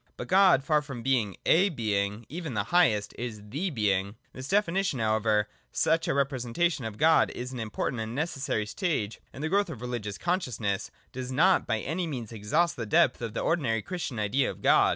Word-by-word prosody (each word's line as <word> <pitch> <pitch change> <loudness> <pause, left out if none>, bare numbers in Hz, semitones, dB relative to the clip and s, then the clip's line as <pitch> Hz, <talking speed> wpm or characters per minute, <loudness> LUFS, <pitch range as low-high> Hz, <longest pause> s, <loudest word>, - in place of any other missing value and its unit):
But - - -6
God, 185 -7 +5
far 150 +2 +2
from 135 -5 -8
being 120 -7 +1
a 190 +5 +5
Being, 105 - -1
even 160 -5 -5
the 105 - +1
highest, 115 -13 +3
is 120 -3 -4
the 160 - -2
Being. 100 - 0 0.2
This 130 +1 -7
definition, 195 -4 +1
however, 110 -1 +1
though - - -35 0.2
such 165 0 +1
a - - +1
representation 140 +2 0
of 110 -2 -5
God 160 +6 +4
is 125 +2 -5
an 125 - -5
important 110 +2 -3
and 110 +2 -5
necessary 135 -8 -1
stage 115 - -2
in 140 - -8
the - - +1
growth 200 +1 +2
of 160 - -6
the 120 - -7
religious 105 -5 -4
conscious 175 - -1
ness, 100 -3 -1 0.2
does 130 0 -5
not 180 +8 +3
by 110 -2 0
any 170 +4 -2
means 120 -8 -5
exhaust 145 +11 0
the 115 -3 -4
depth 105 - +3
of 115 -2 -5
the - - -1
ordinary 120 -10 0
Christian 175 -9 -4
idea 110 +6 +1
of - - -9
God. - - +5
125 Hz, 205 wpm, -28 LUFS, 110-165 Hz, 0.2 s, God